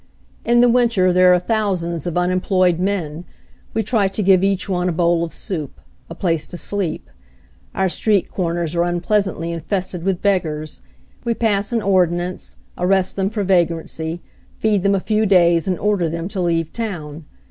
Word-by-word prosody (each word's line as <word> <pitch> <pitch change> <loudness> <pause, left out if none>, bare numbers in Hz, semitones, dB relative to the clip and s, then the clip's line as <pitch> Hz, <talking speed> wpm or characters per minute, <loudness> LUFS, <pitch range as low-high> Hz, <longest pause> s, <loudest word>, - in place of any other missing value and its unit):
In 240 0 +4
the 245 - +6
winter 230 -7 +3
there 180 0 +6
are 180 - +6
thousands 180 -5 -1
of 175 - -3
unem 180 +1 +1
ployed 185 -3 +2
men 175 -4 -2 0.3
— - - -32
we 225 - +1
try 210 -2 +2
to 195 +2 -3
give 190 -1 +4
each 195 -1 +1
one 180 -2 0
a - - 0
bowl 170 0 +1
of 165 - -4
soup, 155 -8 -5 0.3
a 165 - -7
place 165 -4 -1
to 175 - -7
sleep. 190 -4 -3 0.7
Our 190 - +1
street 200 +1 0
corners 170 -3 -2
are 170 - +1
unpleasantly 175 0 0
infested 180 +1 -3
with 190 -1 -1
beggars 155 - -1 0.2
— 65 - -33
we 235 -1 0
pass 205 -2 0
an 230 -2 0
ordinance, 180 -2 0 0.2
arrest 190 +1 +1
them 195 0 0
for 215 -1 -2
vagrancy, 170 -2 -1 0.3
feed 210 -3 +1
them 200 +1 +2
a - - +1
few 215 +2 0
days 175 -2 +4
and 185 -2 0
order 200 -5 0
them 165 +1 -4
to 195 -3 -3
leave 165 -2 0
town. 165 -9 -5
180 Hz, 180 wpm, -20 LUFS, 170-200 Hz, 0.7 s, the